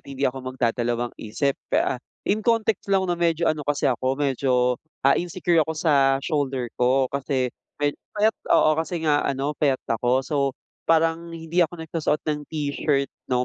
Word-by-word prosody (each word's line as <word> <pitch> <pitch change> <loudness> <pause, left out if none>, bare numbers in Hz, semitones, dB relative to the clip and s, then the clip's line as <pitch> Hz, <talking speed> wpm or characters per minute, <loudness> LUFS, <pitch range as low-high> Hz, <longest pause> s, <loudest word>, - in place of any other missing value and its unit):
at - - -27
hindi 135 0 -6
ako 135 +1 0
magdadalawang-isip. 120 +1 -1 0.2
Pe - - +1
ah, 125 - -2 0.2
in 210 +2 +1
context 225 -3 +1
lang, 195 -1 +3
'no, 180 - 0
medyo 170 -1 +1
ano 155 -2 +1
kasi 145 0 -1
ako, 130 0 +1
medyo, 130 -3 +1 0.2
ah, 135 - +6
insecure 175 -1 +1
ako 160 +1 -1
sa 140 -4 +3
shoulder 135 -6 -1
ko 130 +2 +4
kasi, 130 -2 -1 0.2
me 145 0 +1 0.2
payat, 215 +2 +4 0.2
oo, 155 - +5
kasi 165 0 -3
nga 150 -2 +3
ano, 140 +2 -1
payat 140 -3 +2
ako. 125 +3 +1
So, 150 - -2 0.5
parang 165 +1 +2
hindi 165 +2 -1
ako 175 +1 +1
nagsusuot 160 -2 -1
ng 150 -1 -1
t-shirt, 145 -2 -1 0.2
'no, 125 -1 +1
145 Hz, 170 wpm, -24 LUFS, 130-165 Hz, 0.5 s, ah